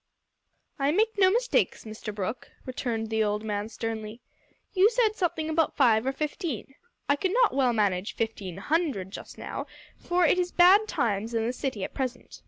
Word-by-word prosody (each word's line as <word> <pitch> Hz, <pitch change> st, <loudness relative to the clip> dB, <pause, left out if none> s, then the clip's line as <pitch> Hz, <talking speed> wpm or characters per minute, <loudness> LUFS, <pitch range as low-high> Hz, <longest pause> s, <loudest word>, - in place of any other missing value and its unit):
"I 275 Hz, +1 st, +2 dB
make 435 Hz, +6 st, +2 dB
no 375 Hz, -1 st, +6 dB
mistakes, 485 Hz, -, +1 dB
Mr 215 Hz, 0 st, -6 dB
Brooke," 215 Hz, +4 st, -4 dB, 0.2 s
returned 230 Hz, -4 st, -3 dB
the 220 Hz, 0 st, +2 dB
old 210 Hz, 0 st, -1 dB
man 210 Hz, 0 st, -3 dB
sternly. 225 Hz, -1 st, -5 dB, 0.5 s
"You 390 Hz, +2 st, +5 dB
said 455 Hz, -2 st, +2 dB
something 340 Hz, -5 st, -1 dB
about 315 Hz, 0 st, +1 dB
five 235 Hz, -3 st, +4 dB
or -, -, +2 dB
fifteen. 295 Hz, -, -4 dB, 0.3 s
I 285 Hz, -, +4 dB
could 375 Hz, +5 st, -1 dB
not -, -, +4 dB
well 260 Hz, -2 st, +3 dB
manage 205 Hz, -3 st, 0 dB
fifteen 205 Hz, -6 st, -3 dB
hundred 270 Hz, -, -1 dB
just -, -, -9 dB
now, -, -, -5 dB, 0.3 s
for 350 Hz, 0 st, +2 dB
it 360 Hz, -, +3 dB
is 355 Hz, 0 st, 0 dB
bad 380 Hz, +5 st, +6 dB
times 230 Hz, -, -1 dB
in 225 Hz, -1 st, +1 dB
the 240 Hz, -, -1 dB
city 255 Hz, -6 st, -3 dB
at -, -, -5 dB
present. 255 Hz, -2 st, -5 dB
255 Hz, 180 wpm, -27 LUFS, 220-350 Hz, 0.5 s, no